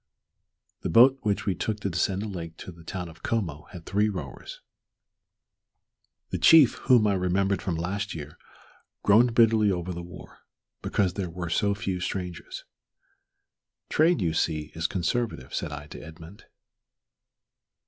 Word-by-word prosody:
The - - -3
boat 130 +9 +6
which 105 -3 -1
we 95 - +1
took 105 +4 -3
to 100 - -1
descend 95 +3 0
the - - -4
lake 85 -5 -7
to - - -9
the 85 -1 -15
town 90 +1 -5
of 80 0 -14
Como 85 -10 -2
had 90 -4 -11
three 105 +2 +1
rowers. 75 -10 -7 1.7
The - - -2
chief, 155 -7 +7 0.2
whom 120 -4 +6
I 105 - +3
remembered 95 +1 0
from 90 -4 -2
last 100 +5 -3
year, 75 -1 -9 0.6
groaned 115 +3 +4
bitterly 110 -2 +5
over 90 0 -3
the 85 - -6
war, 90 +1 -12 0.4
because 95 -4 0
there 95 -2 -3
were 85 0 -5
so 100 +3 +1
few 95 -2 -3
strangers. 90 -1 -5 1.3
"Trade, 155 - +3
you 80 -2 0
see, 75 -2 -1
is 80 0 -1
conservative," 95 - -2
said - - -3
I 75 0 -7
to - - -9
Edmund. 80 +5 -12
95 Hz, 150 wpm, -26 LUFS, 85-105 Hz, 1.7 s, chief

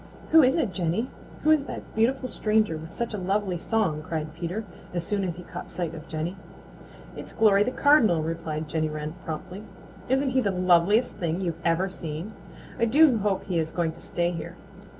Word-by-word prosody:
"Who 320 - +9
is 260 +2 +4
it, 235 - 0
Jenny? 185 +8 -1 0.3
Who 310 - +5
is 300 -3 +4
that - - -8
beautiful 255 +4 +1
stranger 215 -6 +1
with 160 +1 -7
such 235 -1 -4
a 210 - -3
lovely 190 -1 0
song?" 185 -8 0
cried 155 -1 -4
Peter, 175 +6 -4 0.3
as 175 - -1
soon 200 +3 -1
as 175 -3 -2
he 180 - -9
caught - - -8
sight 170 -3 -3
of 160 -2 -9
Jenny. 165 +4 -3 0.8
"It's - - -8
Glory 205 -3 +5
the 210 - +3
Cardinal," 250 - +4
replied 160 -1 -3
Jenny 155 0 -1
Wren 150 0 -4
promptly. 180 +5 -6 0.5
"Isn't 265 +1 +2
he 260 0 +3
the 205 - +1
loveliest 185 +5 +3
thing 170 0 -1
you've 170 -3 -3
ever 170 +3 +2
seen? 170 +2 -6 0.5
I 235 - +4
do 270 0 +5
hope 200 -2 0
he 180 -3 -1
is 160 0 -2
going 170 -2 0
to 165 - -15
stay 175 0 -1
here. 165 -2 -6
185 Hz, 195 wpm, -26 LUFS, 165-220 Hz, 0.8 s, Who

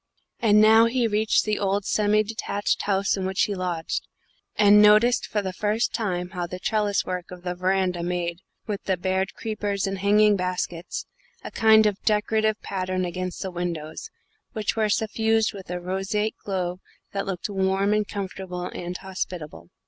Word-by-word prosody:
And 210 -2 +5
now 220 +1 +7
he 245 0 +1
reached 215 0 +2
the 215 -1 0
old 200 0 0
semi 210 0 +2
detached 205 -1 -2
house 195 -1 +1
in 190 - -3
which 190 +1 +1
he 205 - 0
lodged, 180 -4 -3 0.5
and 210 0 +6
noticed 215 +4 +5
for 210 -1 -1
the 190 -1 -3
first 215 +5 0
time 180 -6 -2
how 175 -2 -3
the 180 - -6
trellis 205 +1 0
work 180 -1 -4
of 180 -1 -10
the 180 -1 -2
veranda 185 -1 0
made, 170 -1 -2 0.3
with 205 -2 -3
the 190 -2 +1
bared 190 +1 -1
creepers 205 -3 -2
and 195 -1 -3
hanging 210 +1 +4
baskets, 180 -2 -3 0.4
a - - -7
kind 220 -1 +5
of 205 -2 0
decorative 215 0 +1
pattern 185 -1 -2
against 180 +1 -4
the 190 - -4
windows, 170 -3 -5 0.4
which 215 -4 -1
were 215 -1 +1
suffused 220 +1 +1
with 195 -3 -10
a 180 0 -3
roseate 195 +4 -2
glow 180 -2 -2 0.3
that 195 0 -3
looked 185 -3 -3
warm 195 0 +1
and 210 -1 +1
comfortable 190 -3 -5
and 175 +1 -5
hospitable. 180 - -6
195 Hz, 170 wpm, -25 LUFS, 180-210 Hz, 0.5 s, now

